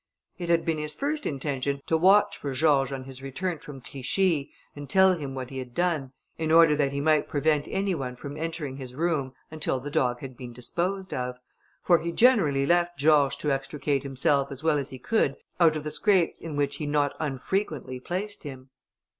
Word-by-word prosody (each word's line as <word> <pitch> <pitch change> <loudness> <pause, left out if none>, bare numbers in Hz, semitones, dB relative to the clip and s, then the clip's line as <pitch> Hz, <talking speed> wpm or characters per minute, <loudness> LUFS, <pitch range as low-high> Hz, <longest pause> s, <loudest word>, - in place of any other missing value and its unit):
It 175 -1 -4
had 170 -1 +3
been 160 -2 0
his 150 0 -3
first 295 +1 -2
intention 140 -1 -2
to 160 - +1
watch 190 +5 +5
for 140 -2 -5
George 140 -1 +3
on 135 -1 -4
his 130 0 -10
return 155 +5 -3
from 140 -3 -10
Clichi, 140 +4 0 0.3
and 145 -1 -8
tell 190 -1 +5
him 140 -5 -6
what 130 -1 -6
he 135 - -5
had 125 -2 -8
done, 165 -7 0 0.3
in 160 -1 -1
order 165 -2 +7
that 145 -2 +1
he 140 - -2
might 155 +1 +2
prevent 150 0 +1
any 195 0 0
one 130 -6 -4
from 140 +3 -8
entering 155 -4 -4
his 130 -2 -8
room 150 -5 -1 0.2
until 155 -4 -1
the 145 +3 -7
dog 125 -3 +1
had 130 -2 -8
been 120 -1 -9
disposed 180 +11 -3
of; 125 0 -3 0.5
for 175 -2 +5
he 170 - -3
generally 170 - +4
left 175 +2 +2
George 145 -2 +4
to 150 - -1
extricate 140 +1 -1
himself, 140 +1 +1
as 135 +2 -7
well 155 -2 +3
as 140 - -4
he 130 - -8
could, 140 - +1 0.2
out 165 -3 +5
of 155 - -3
the 150 - -4
scrapes 190 -4 +2
in 160 -3 -6
which 145 -1 -1
he 150 - -4
not 145 -1 +1
unfrequently 150 -2 -2
placed 190 +9 -4
him. 130 -3 -9
145 Hz, 205 wpm, -27 LUFS, 135-165 Hz, 0.5 s, order